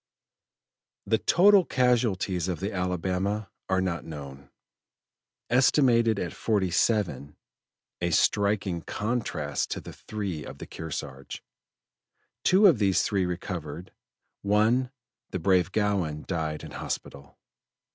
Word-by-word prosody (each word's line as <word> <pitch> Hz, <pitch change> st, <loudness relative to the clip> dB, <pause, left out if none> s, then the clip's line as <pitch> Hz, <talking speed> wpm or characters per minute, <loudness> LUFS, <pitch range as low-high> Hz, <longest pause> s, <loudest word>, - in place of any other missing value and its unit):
The -, -, +2 dB
total 200 Hz, +2 st, +5 dB
casualties 115 Hz, -, +1 dB
of 90 Hz, -2 st, -2 dB
the 100 Hz, +3 st, -3 dB
Alabama 90 Hz, +2 st, -2 dB, 0.2 s
are 95 Hz, 0 st, +2 dB
not 90 Hz, -3 st, -2 dB
known, 70 Hz, -3 st, -9 dB, 1.0 s
estimated 120 Hz, -3 st, +4 dB
at 90 Hz, -4 st, -3 dB
forty 100 Hz, -5 st, 0 dB
seven 85 Hz, -, 0 dB, 0.6 s
a 85 Hz, -, +1 dB
striking 100 Hz, 0 st, +1 dB
contrast 100 Hz, -, -2 dB
to -, -, -3 dB
the -, -, -10 dB
three 100 Hz, -8 st, -5 dB
of -, -, -9 dB
the -, -, -8 dB
Kearsarge. 70 Hz, -4 st, -7 dB, 1.0 s
Two 195 Hz, +3 st, +5 dB
of 165 Hz, -, +6 dB
these 100 Hz, -3 st, +3 dB
three 95 Hz, -3 st, 0 dB
recovered; 90 Hz, -2 st, -5 dB, 0.5 s
one, 110 Hz, +5 st, +2 dB, 0.4 s
the -, -, -3 dB
brave 90 Hz, +1 st, +2 dB
Gowin, 95 Hz, -8 st, 0 dB
died 80 Hz, -4 st, -3 dB
in 80 Hz, -, -9 dB
hospital. 70 Hz, 0 st, -6 dB
95 Hz, 115 wpm, -27 LUFS, 80-110 Hz, 1.0 s, of